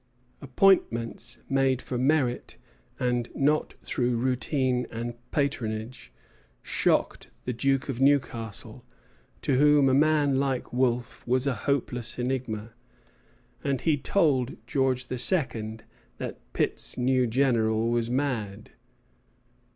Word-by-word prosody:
Appointments 120 -6 +1
made 135 -1 +2
for 130 - -6
merit, 130 -1 0 0.4
and 125 -1 0
not 150 +2 +1
through 125 -1 0
routine 130 0 0
and 120 +1 -4 0.2
patronage, 110 - -3 0.5
shocked - - 0 0.2
the 125 - -1
Duke 135 +2 0
of 135 -2 -3
Newcastle, 125 -6 0 0.6
to 135 - +2
whom 145 -1 +5
a 130 - +3
man 145 -1 +3
like 135 -3 -2
Wolfe 125 -1 0
was 130 +2 +2
a 140 - +1
hopeless 125 -1 -2
enigma; 120 -3 -3 0.9
and 135 -2 -1
he 160 -2 +3
told 140 -4 +1
George 130 0 0
II. 120 - 0 0.4
that - - -6
Pitt's - - -1
new 130 0 +2
general 115 -3 +2
was 120 -1 0
mad. 115 -6 -2
130 Hz, 110 wpm, -27 LUFS, 120-140 Hz, 0.9 s, whom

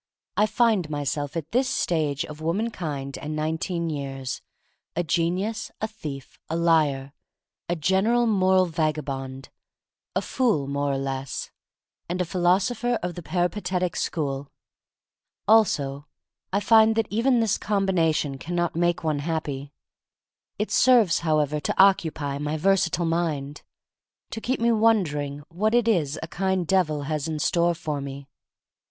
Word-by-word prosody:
I 210 - +3
find 215 -6 +2
myself 145 0 -2
at 160 -1 -5
this 255 +2 +2
stage 155 - 0
of 150 0 -10
womankind 160 -7 -3
and 155 +1 -5
nineteen 160 +2 -2
years, 135 -4 -4 0.5
a 175 - +1
genius, 180 +8 -1
a 220 - -1
thief, 150 - -8
a 160 - -1
liar 150 -5 +2 0.3
— - - -55
a 175 - +1
general 195 +9 +2
moral 190 -4 +4
vagabond, 140 -5 -3 0.7
a - - +1
fool 225 - +1
more 140 +1 -1
or 135 - 0
less, 135 0 -4 0.6
and 180 +1 -2
a 180 - +1
philosopher 195 +8 +1
of 180 0 -2
the 175 - -7
peripa 175 +5 -1
tetic 180 -1 -1
school. 140 -3 -2 1.0
Also 145 -10 +3 0.4
I 200 +2 +1
find 220 +1 +5
that 225 0 +2
even 240 +4 +3
this 225 -3 +1
combination 165 -9 +1
can 175 +5 -5
not 175 -1 0
make 175 +1 +1
one 155 -2 0
happy. 145 -3 -3 0.9
It 210 - -2
serves, 235 -8 +5
however, 150 -2 +1
to 140 - -3
occupy 160 -7 +3
my 150 +1 -2
versa 190 +2 +3
tile 170 0 -1
mind, 155 -4 -1 0.7
to 225 - -5
keep 255 +3 -1
me 235 +1 +3
wondering 155 -11 +1
what 215 +7 0
it 240 -1 +3
is 160 -10 +1
a - - -4
kind 190 +1 -1
Devil 155 -5 +1
has 150 +1 -2
in 160 -1 -2
store 170 +3 +2
for 155 -3 -3
me. 140 0 -7
165 Hz, 145 wpm, -25 LUFS, 145-195 Hz, 1.0 s, find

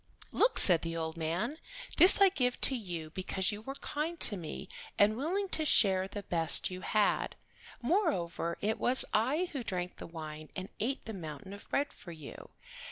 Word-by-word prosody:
"Look," 470 +1 +2
said 175 -4 +5
the 165 0 -5
old 160 0 -4
man. 170 - -3 0.4
"This 365 +3 +7
I 395 - +7
give 250 -8 -1
to 270 - +3
you 175 -9 -6
because 190 +3 -2
you 205 0 -7
were 270 +5 -7
kind 310 +4 -5
to 210 - +9
me 175 0 -7 0.3
and 210 +1 +3
willing 360 - -2
to 315 - -1
share 190 -9 +3
the 200 +1 -8
best 165 0 +4
you 185 0 -7
had. 210 +1 0 0.5
Moreover 235 - -1
it 215 +2 -1
was 255 +2 +5
I 285 +12 0
who 275 - -4
drank 180 -5 -4
the - - -9
wine 155 -2 -9
and 190 +1 -6
ate 255 +6 -3
the 220 - -6
mountain 160 0 -8
of 200 - -13
bread 285 +1 -1
for 175 - -12
you. 155 -4 -11
200 Hz, 185 wpm, -31 LUFS, 170-270 Hz, 0.5 s, to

